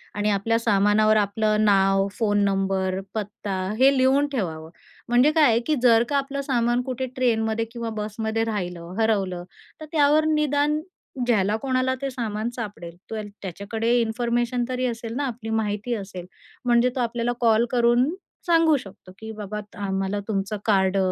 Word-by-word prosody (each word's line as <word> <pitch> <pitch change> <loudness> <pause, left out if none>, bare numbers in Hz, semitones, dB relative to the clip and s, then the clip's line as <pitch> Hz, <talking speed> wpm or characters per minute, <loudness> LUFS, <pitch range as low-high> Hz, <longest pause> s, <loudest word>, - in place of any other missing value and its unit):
आणि 210 +1 0
आपल्या 210 +3 +1
सामानावर 215 0 +3
आपलं 215 +1 +1
नाव, 195 -1 +3
फोन 205 -2 +2
नंबर, 195 -1 0
पत्ता 205 -2 -4 0.2
हे 270 +2 +5
लिहून 270 +3 +3
ठेवावं. 160 - -3 0.4
म्हणजे 250 +5 +4
काय 315 -1 +3
आहे, 230 +1 +3
की 305 +6 0
जर 230 -2 +6
का 285 - +1
आपलं 280 0 -2
सामान 240 -2 +1
कुठे 260 0 -3
ट्रेनमध्ये 225 -3 +1
किंवा 235 -1 -4
बसमध्ये 220 +1 -2
राहिलं, 180 -5 -4
हरवलं. 195 -5 0 0.4
तर - - -6
त्यावर 300 0 +4
निदान 300 0 +1 0.5
ज्याला 210 -3 +2
कोणाला 260 -1 0
ते 275 - -2
सामान 225 -2 -3
सापडेल, 195 -7 -7
तो 225 - -4
अ‍ॅ 215 - -4 0.2
त्याच्याकडे 205 +5 -3
इन्फॉर्मेशन 240 +2 0
तरी 255 0 -1
असेल 230 -1 -4
ना 285 - -1
आपली 230 -2 -6
माहिती 210 +3 -2
असेल. 190 -3 -7 0.4
म्हणजे 240 0 +4
तो - - -2
आपल्याला 240 0 -1
कॉल 225 0 +4
करून 240 +2 +3 0.4
सांगू 330 -3 +4
शकतो, 195 -5 -12
की 220 0 -7
बाबा 210 -1 -6 0.3
आम्हाला 195 +1 -1
तुमचं 205 0 -2
कार्ड 195 -2 +2
225 Hz, 155 wpm, -24 LUFS, 200-250 Hz, 0.5 s, जर